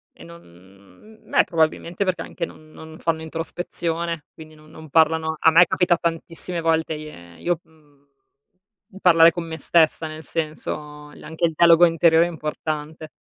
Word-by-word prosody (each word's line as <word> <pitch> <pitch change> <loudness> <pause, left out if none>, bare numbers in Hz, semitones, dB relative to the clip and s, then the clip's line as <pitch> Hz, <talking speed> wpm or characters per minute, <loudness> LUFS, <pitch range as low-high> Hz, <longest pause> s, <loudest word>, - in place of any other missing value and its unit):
E - - -14
non 170 0 -13
mhmm, 95 - -20
beh - - +4
probabilmente 170 +3 -1
perché 185 -1 -1
anche - - -5
non 155 -1 -16
non 160 +1 -12
fanno 160 -1 -2
introspezione, 165 0 -4
quindi 155 -1 -13
non 155 0 -19
non 160 0 -13
parlano 160 +1 +2
a 160 - +5
me 170 +3 +7
capita 180 -1 +1
tantissime 170 +1 -3
volte 160 0 0
ie 120 - -11
io 175 -1 -1
mhmm, 150 -3 -27 1.0
parlare 165 -2 +7
con 170 0 -6
me 160 -1 -7
stessa, 160 +1 +2
nel 155 0 -9
senso, 150 -2 -5
la - - -14
anche 160 +2 -4
il 165 - +2
dialogo 170 +1 +6
interiore 165 -1 +4
è - - -5
importante. 155 0 -5
160 Hz, 165 wpm, -22 LUFS, 155-170 Hz, 1.0 s, me